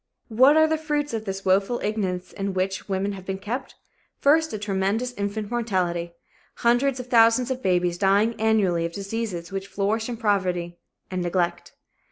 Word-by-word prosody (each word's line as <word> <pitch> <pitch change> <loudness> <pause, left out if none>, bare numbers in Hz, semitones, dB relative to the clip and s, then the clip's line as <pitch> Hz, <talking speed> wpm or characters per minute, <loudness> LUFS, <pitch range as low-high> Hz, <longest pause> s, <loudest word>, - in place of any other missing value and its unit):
What 260 +7 +5
are 315 - +6
the 315 0 0
fruits 295 -2 -2
of 220 -1 -3
this 195 -1 -5
woeful 195 +5 +2
ignorance 195 -4 -2
in 195 -1 -3
which 190 +2 -2
women 195 +1 -1
have 190 -2 -8
been 190 0 -4
kept? 245 +7 -5 0.4
First, 315 +2 +3
a - - -3
tremendous 205 +4 -1
infant 205 0 -4
mortality 180 -7 -1 0.4
hundreds 250 +3 +2
of 250 - -5
thousands 235 +1 +4
of 260 0 -3
babies 180 -3 +1
dying 205 +3 +3
annually 200 -6 +2
of 170 0 -3
diseases 200 -3 -4
which 195 0 -4
flourish 215 +4 -1
in 240 - -4
poverty 180 -6 -1 0.3
and 185 -1 -2
neglect. 175 0 -1
205 Hz, 170 wpm, -24 LUFS, 185-235 Hz, 0.4 s, are